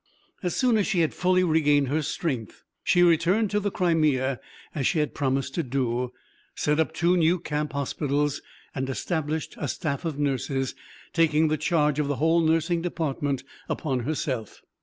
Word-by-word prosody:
As 180 -2 -2
soon 250 -4 +3
as 205 - +1
she 185 -6 +2
had 160 - +1
fully 185 0 +2
regained 150 -5 +3
her 155 +3 +1
strength, 135 - -3 0.2
she 175 - +4
returned 175 +5 +3
to 210 - +2
the 205 0 -1
Crimea 150 - +1 0.3
as 140 -4 0
she - - +1
had 150 -1 0
promised 135 -1 -1
to 170 - 0
do, 125 -3 -1 0.4
set 150 +1 +1
up 160 - +2
two 175 +2 +2
new 170 +1 +3
camp 150 -3 -3
hospitals, 145 +1 -1 0.3
and 130 -1 -3
established 155 +2 -2
a 145 - -2
staff 140 +1 -3
of 160 -4 -3
nurses, 135 -2 -1 0.4
taking 160 -1 +3
the 155 - +2
charge 150 -4 +1
of 150 - +1
the 145 - 0
whole 165 +4 +3
nursing 165 +1 +2
department 145 -6 -2 0.3
upon 135 -5 -1
herself. 130 -4 -3
150 Hz, 170 wpm, -26 LUFS, 140-170 Hz, 0.4 s, she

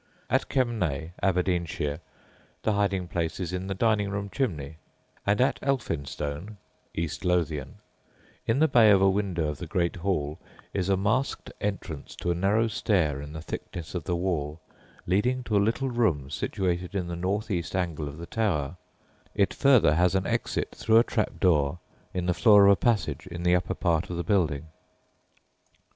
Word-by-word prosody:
At - - +1
Kemnay 90 - 0
(Aberdeenshire) 85 -5 0 0.6
the 110 - +2
hiding 100 -3 0
place 85 -1 -2
is 90 -2 -3
in 90 +1 -3
the 95 - -2
dining 105 -1 +2
room 100 0 -4
chimney; 80 - -2 0.5
and 100 +1 +3
at 130 - +2
Elphinstone 85 - -3 0.4
(East 85 -1 -3
Lothian), 80 -6 0 0.7
in 115 - +2
the 160 +2 +5
bay 115 -7 +6
of 100 -2 +6
a 95 0 +5
window 95 -6 -1
of 75 - -5
the - - -6
great 85 0 0
hall, 80 -5 -1 0.3
is 95 -1 -1
a 95 - +3
masked 110 +8 -1
entrance 95 -7 -4
to 85 - -2
a - - +2
narrow 100 +6 +2
stair 85 -10 +1
in 75 +1 -8
the 80 +1 -7
thickness 85 -1 -6
of 85 -4 -4
the 90 - 0
wall 85 -4 -2 0.5
leading 125 +8 +1
to 110 - -1
a - - +5
little 120 +5 0
room 85 - +1
situated 90 +2 -2
in 90 -3 -1
the 85 - -4
northeast 95 0 -2
angle 85 -5 -1
of 70 +1 -8
the 85 - -7
tower; 90 -8 -1 0.6
it 100 -2 +2
further 130 - +5
has 90 +3 +3
an 95 0 +1
exit - - -1
through 110 0 +3
a 115 - +7
trap 110 -3 -2
door 75 -4 +3 0.3
in 90 -1 -2
the 90 - +2
floor 105 0 +6
of 100 - +8
a - - +6
passage 105 0 0
in 85 -1 -6
the 90 0 +4
upper 90 - -1
part 85 -2 0
of 85 - -4
the 85 - -1
building. 80 -8 +1
90 Hz, 175 wpm, -27 LUFS, 85-105 Hz, 0.7 s, of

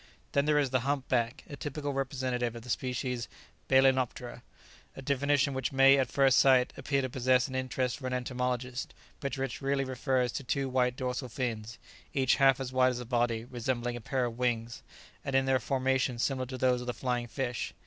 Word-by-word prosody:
Then 140 0 +2
there 150 0 +3
is 140 -3 +1
the 130 - +3
Hump 135 +1 -1
back, 120 -1 0
a 145 - -7
typical 145 0 -4
representative 130 -3 -2
of 115 - -8
the 125 - -5
species 125 -1 -2 0.4
"balænoptera," 130 -2 +2 0.5
a - - -8
definition 140 +1 +1
which 130 0 -2
may 135 0 +6
at 130 -3 +1
first 135 -2 +4
sight 130 -2 +4
appear 140 -2 -1
to 130 - -2
possess 130 0 +2
an 130 - -9
interest 130 0 -1
for 130 - -4
an 130 - -3
entomologist, 125 0 -3 0.2
but 140 -2 -3
which 135 -2 -3
really 135 0 +1
refers 130 -1 0
to 140 - -5
two 135 +2 -1
white 125 -1 +1
dorsal 125 0 -3
fins, 115 -3 -4 0.4
each 130 -2 +3
half 135 -2 +5
as 130 -1 -5
wide 130 0 +4
as 125 - -2
the 125 - -6
body, 120 -2 0
resembling 120 -1 -2
a 120 - -6
pair 130 +1 -1
of 120 0 -5
wings, 115 -2 -1 0.4
and 140 - -2
in 135 0 +4
their 135 -1 +3
formation 130 -2 0
similar 130 +1 -1
to 130 0 -6
those 125 -1 +2
of 125 - -7
the 125 - -2
flying 120 0 -2
fish. 125 0 -3
130 Hz, 200 wpm, -30 LUFS, 125-135 Hz, 0.5 s, may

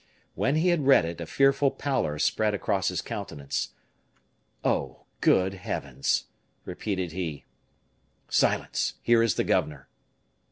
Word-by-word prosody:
When 135 - +1
he 165 +3 +3
had 160 -6 +1
read 135 -11 +6
it, 85 0 -5
a 85 - -5
fearful 135 - +3
pallor 130 - -1
spread 105 +6 +1
across 100 -2 0
his - - -1
countenance. 70 -1 -4 0.9
"Oh! - - -1 0.2
good 95 +1 +3
heavens!" 70 -8 -2 0.4
repeated 95 -1 -3
he. 80 -5 -5 0.8
"Silence! - - +1
Here 120 -1 +4
is 115 -1 +2
the - - +1
governor." 75 -3 -1
95 Hz, 125 wpm, -27 LUFS, 80-135 Hz, 0.9 s, read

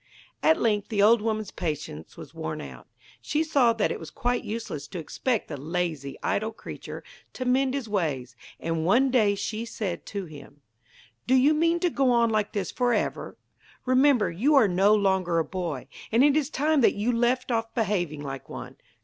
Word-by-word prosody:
At 320 - +4
length 210 -3 +1
the 200 -2 +2
old 225 +1 +6
woman's 215 -2 -2
patience 150 - -5
was - - -11
worn - - -5
out. 65 -3 -10 0.3
She 300 +2 0
saw 280 -7 +3
that 225 -2 0
it - - -4
was - - -8
quite 245 0 -1
useless 220 -9 -5
to 190 - -7
expect 225 - -2
the 150 - -6
lazy, 160 -3 -3
idle 220 +2 0
creature 220 - -9 0.3
to 255 - -5
mend 260 +1 +2
his 270 -5 -3
ways, 150 - -2 0.2
and 165 -1 -2
one 245 +10 +3
day 215 -5 +3
she 215 +3 -3
said 200 -6 -5
to 200 -2 -4
him: 145 -2 -13 0.7
'Do 260 - +4
you 270 +4 +5
mean 335 +2 +2
to 355 - +2
go 270 -3 +2
on 235 -2 +3
like 215 -1 0
this 195 -4 -2
for 245 -1 +1
ever? - - -3 0.5
Remember, 255 -3 +4
you 255 - +2
are 255 -6 +6
no 195 +3 +4
longer 190 -4 +1
a 165 - +1
boy, 170 -8 -4 0.2
and 230 +4 +4
it 290 0 +5
is 300 -2 +1
time 300 0 +1
that - - +4
you 215 +4 0
left 245 +2 +1
off 225 -1 -1
behaving 175 - -1
like 135 -1 -7
one. - - -8
215 Hz, 190 wpm, -26 LUFS, 175-255 Hz, 0.7 s, old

